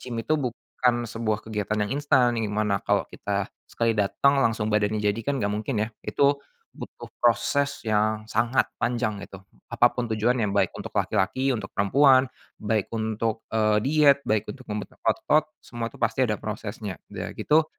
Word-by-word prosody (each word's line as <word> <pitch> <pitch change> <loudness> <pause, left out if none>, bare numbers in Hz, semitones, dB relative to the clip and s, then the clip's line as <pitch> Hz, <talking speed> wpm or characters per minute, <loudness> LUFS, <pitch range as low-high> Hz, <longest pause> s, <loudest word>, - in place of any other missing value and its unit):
gym 125 -2 -6
itu 155 - +1
bukan 120 -1 -1
sebuah 110 -1 -2
kegiatan 105 -1 -2
yang 105 - -4
instan 130 -5 +3
yang 110 - -1
dimana 105 -1 0
kalau - - +1
kita - - -2 0.2
sekali 115 -1 +1
dateng 135 +7 +2
langsung 115 -3 +1
badannya 105 0 +1
jadi 105 +2 +1
kan 140 - +1
gak 105 - 0
mungkin 110 +4 -2
ya 110 - -7
itu, 140 0 +1 0.3
butuh - - -9 0.2
proses 130 +3 +1
yang 110 0 +1
sangat 120 +4 +1 0.2
panjang 120 -4 -1
itu 100 -1 -10 0.3
apa 120 - +4
pun 120 -2 -3
tujuannya 110 0 +1
baik 100 -2 +1
untuk - - -7
laki-laki, 130 +8 +1
untuk 105 -4 -5
perempuan, 130 +6 +5 0.3
baik 105 -1 -1
untuk, 110 0 -2
eee, 110 -1 +3
diet, 145 0 +5
baik 110 -1 +1
untuk 130 -2 -15
membentuk 105 0 -5
otot 155 0 +2
semua 120 -1 -5
itu - - -15
pasti 115 +3 +2
ada 110 - 0
prosesnya 105 -2 -5
udah - - -5
gitu, 155 +1 +3
115 Hz, 170 wpm, -25 LUFS, 105-130 Hz, 0.3 s, perempuan